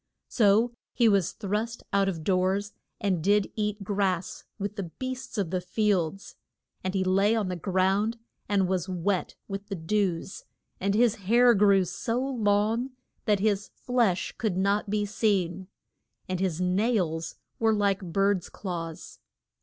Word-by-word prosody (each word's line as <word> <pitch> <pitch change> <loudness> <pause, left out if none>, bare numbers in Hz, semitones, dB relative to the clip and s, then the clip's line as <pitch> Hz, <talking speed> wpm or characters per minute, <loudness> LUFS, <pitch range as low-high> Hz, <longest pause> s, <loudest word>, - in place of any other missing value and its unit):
So 225 +2 +3 0.2
he 235 -2 +4
was 200 -5 +3
thrust 215 +3 -3
out 195 -1 +3
of 165 -4 -5
doors, 190 +3 +1 0.3
and 185 -6 0
did 205 +1 +3
eat 210 -1 -2
grass 190 -3 -1
with 205 0 -4
the 200 -3 -3
beasts 260 -2 -5
of 190 -5 -1
the 185 -1 0
fields. 195 -1 -1 0.5
And 185 +1 -2
he 190 - +2
lay 195 +4 +3
on 210 -4 0
the 180 - -2
ground, 190 +5 +1 0.3
and 195 -2 +2
was 185 0 -1
wet 185 +1 -1
with 195 0 -6
the 200 - -4
dews, 185 +1 -1 0.4
and 200 +1 0
his 235 -1 +4 0.2
hair 240 +1 +6
grew 200 -2 +4
so 230 +7 -2
long 230 -1 +1 0.3
that 210 -4 +2
his 205 -1 +1
flesh 235 -8 0
could 215 -6 0
not 200 +2 +1
be 210 0 0
seen, 190 -4 0 0.6
and 185 -1 -2
his 180 -3 -1
nails 180 -3 0 0.2
were 225 -1 +3
like 200 -2 +1
bird's 195 -1 +1
claws. 165 -4 -6
200 Hz, 150 wpm, -27 LUFS, 185-215 Hz, 0.6 s, hair